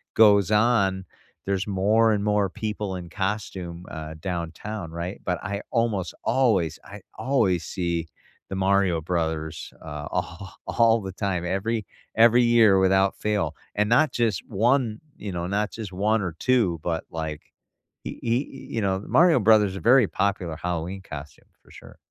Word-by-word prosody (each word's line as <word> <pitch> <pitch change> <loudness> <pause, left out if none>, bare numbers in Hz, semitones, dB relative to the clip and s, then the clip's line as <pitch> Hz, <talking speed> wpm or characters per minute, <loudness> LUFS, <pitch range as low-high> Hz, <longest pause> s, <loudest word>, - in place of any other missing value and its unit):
goes 105 -2 +5
on, 105 -4 +2 0.4
there's 100 0 -1
more 105 +4 +3
and 100 -1 -1
more 105 -2 +2
people 105 -2 -4
in 90 -1 -8
costume, 95 -3 -4
uh, 80 0 -7
downtown, 85 +2 -5
right, 85 +3 -5
but 90 -2 -1
I 100 0 -3
almost 110 - 0
always, 95 - +2
I 100 -1 -10 0.2
always 100 - +1
see 85 -2 -2 0.4
the 95 - -4
Mario 95 -3 +2
Brothers, 80 -2 -3
uh, 75 -2 -6
all 90 +2 -4
all 115 -1 +3
the 95 - -6
time, 95 -4 -2
every 105 +5 -1 0.3
every 120 +2 +6
year 115 -4 +5
without 95 +1 +3
fail, 100 -8 -1 0.2
and 105 0 +1
not 150 +6 +4
just 115 -6 0
1, 115 +1 +1 0.2
you 100 -2 -6
know, 85 0 -3
not 105 +2 -1
just 110 -4 -7
1 105 +3 +1
or 90 -4 -4
2, 110 -11 +2
but, 80 -2 -2
like 80 -2 -4 0.6
y - - -4
y 120 +4 +1
you 115 -4 -5
know, 95 0 0
Mario 170 -4 +5
Brothers 105 -2 +5
is - - -6
very 125 +3 +5
popular 95 -4 -1
Halloween 90 +2 -3
costume 70 -5 -10 0.2
for - - -20
sure. - - -14
100 Hz, 155 wpm, -25 LUFS, 90-110 Hz, 0.6 s, every